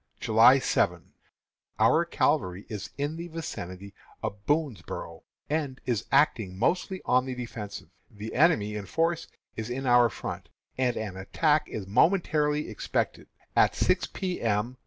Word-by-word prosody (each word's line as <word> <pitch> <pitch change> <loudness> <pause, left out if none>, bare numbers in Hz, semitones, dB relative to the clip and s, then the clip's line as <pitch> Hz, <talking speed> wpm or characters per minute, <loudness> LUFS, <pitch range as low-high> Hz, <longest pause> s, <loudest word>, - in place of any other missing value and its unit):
] - - -40
July 115 +4 +6
7. 135 - 0 0.6
Our - - +4
cavalry 90 +2 0
is 105 -3 -5
in 145 +3 -2
the 170 +1 -5
vicinity 100 - -7 0.3
of 100 0 -4
Boonsboro', 145 - -2 0.3
and 145 -4 -2
is 120 -4 -1
acting 115 -9 +2
mostly 180 - 0
on 125 +1 +3
the 130 - -3
defensive. 115 -4 -7 0.2
The 105 +2 -8
enemy 130 -9 +3
in 100 -2 -5
force 165 - 0 0.3
is 110 +1 -4
in 135 +2 -3
our 120 -1 +5
front, - - -6 0.3
and 125 -2 0
an 105 -4 -4
attack 150 +11 +1
is 105 - -5
momentarily 150 - +2
expected. 110 - -2 0.3
At - - +4
six - - +2
P. 185 -2 -4
M. 115 +3 0
125 Hz, 145 wpm, -28 LUFS, 105-150 Hz, 0.6 s, July